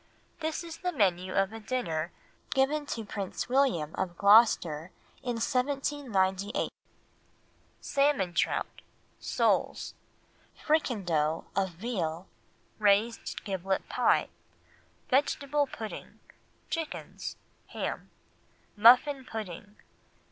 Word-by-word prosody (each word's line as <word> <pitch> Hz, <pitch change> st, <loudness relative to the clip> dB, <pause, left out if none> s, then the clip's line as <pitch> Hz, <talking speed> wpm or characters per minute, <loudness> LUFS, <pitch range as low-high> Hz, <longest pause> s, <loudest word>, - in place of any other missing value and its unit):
This 315 Hz, +1 st, -2 dB
is 330 Hz, -1 st, -8 dB
the 360 Hz, -1 st, -2 dB
menu 185 Hz, -, +1 dB
of 195 Hz, +2 st, +2 dB
a 225 Hz, -, -6 dB
dinner 175 Hz, -8 st, -2 dB, 0.4 s
given 285 Hz, +2 st, +1 dB
to 225 Hz, -4 st, -4 dB
Prince 200 Hz, -2 st, -4 dB
William 245 Hz, -, +2 dB
of 175 Hz, -2 st, -3 dB
Gloucester 200 Hz, -7 st, +5 dB, 0.3 s
in 245 Hz, -2 st, -2 dB
1798— 235 Hz, -6 st, 0 dB, 1.1 s
Salmon 275 Hz, -11 st, +1 dB
Trout. -, -, -1 dB, 0.4 s
Soles. -, -, 0 dB, 0.6 s
Fricando 175 Hz, -, 0 dB
of 195 Hz, 0 st, +1 dB
Veal. 175 Hz, -4 st, -3 dB, 0.5 s
Raised 210 Hz, +3 st, +2 dB
Giblet 190 Hz, -1 st, -2 dB
Pie. -, -, +2 dB, 0.8 s
Vegetable 285 Hz, +1 st, +2 dB
Pudding. 220 Hz, -4 st, -8 dB, 0.5 s
Chickens. 325 Hz, -2 st, -5 dB, 0.3 s
Ham. -, -, -4 dB, 0.7 s
Muffin 250 Hz, +6 st, +6 dB
Pudding. 210 Hz, -4 st, -7 dB
215 Hz, 90 wpm, -29 LUFS, 190-270 Hz, 1.1 s, Muffin